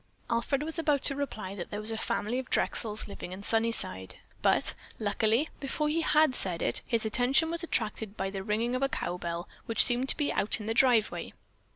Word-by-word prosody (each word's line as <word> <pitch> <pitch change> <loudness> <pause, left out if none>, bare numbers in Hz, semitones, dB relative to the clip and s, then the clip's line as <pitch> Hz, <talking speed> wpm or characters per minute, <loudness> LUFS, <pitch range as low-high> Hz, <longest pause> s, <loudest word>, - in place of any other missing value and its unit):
Alfred 250 +5 0
was 320 +2 -2
about 295 -4 +1
to 275 - 0
reply 220 -9 -4
that 180 -4 -6
there 205 - -4
was 215 +1 +4
a - - -2
family 220 +2 -1
of 260 - -7
Drexels 215 -2 0
living 190 -3 -7
in 195 +2 -8
Sunnyside, 225 - +1 0.3
but, - - +3 0.2
luckily, 220 +6 +1
before 300 +2 -1
he 325 +2 +1
had 310 -3 +4
said 180 -8 -3
it, - - +2
his 230 -2 0
attention 265 +9 +3
was 335 0 -3
attracted 215 - -2
by 195 0 -2
the 195 -1 -4
ringing 220 +4 -1
of 255 - -2
a 275 - +2
cow 180 - -3
bell 170 +1 -4 0.2
which 230 - +5
seemed 250 +2 +1
to - - +4
be 295 -2 0
out 210 - 0
in 210 - -7
the 225 - -1
driveway. 240 -3 +2
230 Hz, 210 wpm, -29 LUFS, 205-275 Hz, 0.3 s, which